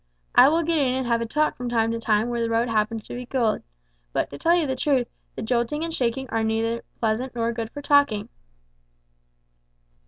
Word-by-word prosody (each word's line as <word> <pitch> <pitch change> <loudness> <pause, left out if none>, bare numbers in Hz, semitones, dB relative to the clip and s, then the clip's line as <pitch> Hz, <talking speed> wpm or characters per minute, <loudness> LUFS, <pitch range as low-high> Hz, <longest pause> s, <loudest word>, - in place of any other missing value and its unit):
I - - +8
will 330 +2 +2
get 325 0 +1
in 260 -3 +2
and 260 -1 -1
have 235 -1 +1
a 230 - -2
talk 300 +6 +1
from 245 0 -4
time 225 -1 +1
to 230 - -2
time 220 +1 +1
where 240 -1 -1
the 230 - 0
road 230 +1 +1
happens 220 -1 -1
to - - -8
be 245 0 -6
good; 240 -5 0 0.5
but, - - -1
to 140 - -8
tell 340 +1 +4
you 340 -3 +2
the 265 -2 -1
truth, 260 -2 +1 0.3
the - - -5
jolting 240 +6 0
and 330 0 -3
shaking 260 -1 -1
are 225 0 0
neither 225 +1 -1 0.2
pleasant 235 +3 -1
nor 230 0 0
good 225 -1 -4
for 290 +4 -9
talking." 280 -9 +3
235 Hz, 215 wpm, -24 LUFS, 225-265 Hz, 0.5 s, I